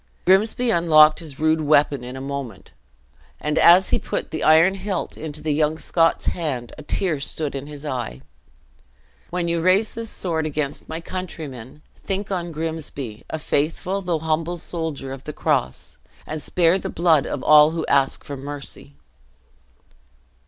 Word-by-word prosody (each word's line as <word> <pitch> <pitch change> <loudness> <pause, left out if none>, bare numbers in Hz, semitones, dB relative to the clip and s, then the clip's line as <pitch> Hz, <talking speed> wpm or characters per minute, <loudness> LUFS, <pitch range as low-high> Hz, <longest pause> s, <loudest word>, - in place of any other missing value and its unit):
Grimsby 220 +6 +3
unlocked 155 -3 +6
his 155 -4 -9
rude 155 0 +2
weapon 145 -3 +3
in 125 +1 -7
a 130 - -6
moment, 135 -6 -6 0.7
and 150 0 0
as 180 +3 +7
he - - +2
put - - -4
the 155 - -4
iron 160 +4 +6
hilt 195 -1 -4
into 155 -1 -7
the 155 -1 0
young 155 +1 +1
Scot's 165 0 +1
hand, 135 -9 -3
a - - -10
tear 155 +1 -1
stood 150 +1 -2
in 140 +1 -5
his 150 0 -9
eye: 120 - -4 1.1
"When 175 -1 -2
you 170 0 0
raise 190 +5 +3
this 230 -1 -5
sword 160 -6 -2
against 150 -1 -4
my 160 +1 -5
countrymen, 150 -8 -7
think 195 +1 -4
on 175 -2 -2
Grimsby, 150 -8 -5
a - - -3
faithful, 160 +6 -1
though 175 -3 -1
humble 160 +2 -1
soldier 160 -6 -5
of 135 - -10
the 150 - -5
cross, 65 - -2 0.3
and 155 0 -5
spare 175 +3 +2
the - - -5
blood 165 -4 +3
of 135 - -4
all 150 0 +7
who 165 0 -3
ask 135 -1 +1
for 145 - -6
mercy." 140 - -8
155 Hz, 160 wpm, -22 LUFS, 145-170 Hz, 1.1 s, as